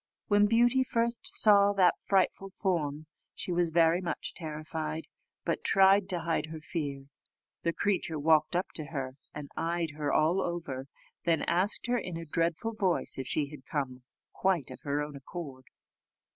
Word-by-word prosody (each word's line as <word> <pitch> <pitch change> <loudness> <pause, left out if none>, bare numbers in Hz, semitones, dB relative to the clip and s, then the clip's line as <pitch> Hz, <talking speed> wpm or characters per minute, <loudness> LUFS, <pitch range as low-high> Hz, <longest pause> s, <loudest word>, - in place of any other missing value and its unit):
When 205 0 +5
Beauty 240 +4 +4
first 235 -1 -1
saw 205 -1 +5
that 185 -3 +4
frightful 195 0 +1
form, 155 -6 -1 0.3
she - - -4
was 175 -1 +2
very 165 +2 +4
much 175 - -3
terrified, 155 0 -5 0.4
but - - -1
tried 195 0 +5
to 175 -3 0
hide 165 -2 -1
her 160 0 -7
fear. 145 -3 -4 0.6
The 170 - +1
creature 175 -3 0
walked 155 +2 +3
up 180 - 0
to 155 - -4
her, 135 -3 -5 0.2
and 150 -1 -7
eyed 165 0 -1
her 150 -1 -2
all 165 +5 +3
over 145 -7 -4 0.4
then 165 -2 +2
asked 185 +5 +1
her 245 0 +1
in 180 -6 -5
a 165 - -6
dreadful 165 +8 -1
voice 185 -9 0
if 130 - -4
she 145 +1 -1
had 140 -4 -12
come 130 -4 -3 0.3
quite 185 -8 0
of - - -9
her 145 +1 -1
own 150 -1 -7
accord. 135 -2 -8
165 Hz, 165 wpm, -30 LUFS, 150-190 Hz, 0.6 s, When